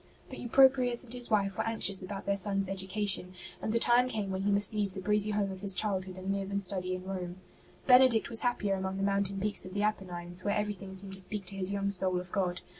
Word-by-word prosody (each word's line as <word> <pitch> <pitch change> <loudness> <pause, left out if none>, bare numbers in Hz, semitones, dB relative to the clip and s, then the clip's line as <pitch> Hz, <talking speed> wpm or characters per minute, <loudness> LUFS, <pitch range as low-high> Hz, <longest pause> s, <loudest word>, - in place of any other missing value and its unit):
But - - -8
Eupropius 255 -1 +4
and 245 -1 -11
his 245 -1 +1
wife 200 -3 0
were - - +2
anxious 210 -4 +1
about 195 +2 -7
their 200 - +1
son's 195 0 -1
education, 190 -1 0 0.3
and - - -2
the 230 - +2
time 240 +2 +4
came 210 -5 -3
when 190 0 -3
he 200 +1 +1
must 200 +1 +3
leave 205 -3 -2
the - - -4
breezy 210 +2 +1
home 205 -2 -1
of 190 - -8
his 195 -1 -1
childhood 190 -3 -2
and 190 +1 -3
live 195 -1 -3
and 200 0 -1
study 185 -1 -1
in 185 - -7
Rome. 185 -2 -5 0.5
Benedict 250 -3 +5
was 230 - +1
happier 245 -5 0
among 190 0 -3
the 195 - -2
mountain 200 0 0
peaks 205 +1 -1
of 185 +1 -9
the 205 - 0
Apennines, 180 -4 -3
where 205 - 0
everything 205 -2 -4
seemed 195 0 +1
to 190 - -6
speak 195 +1 -2
to 195 - -7
his 190 0 0
young 200 0 -1
soul 185 -1 +3
of 180 0 -10
God. 180 -3 -1
195 Hz, 245 wpm, -30 LUFS, 190-210 Hz, 0.5 s, Benedict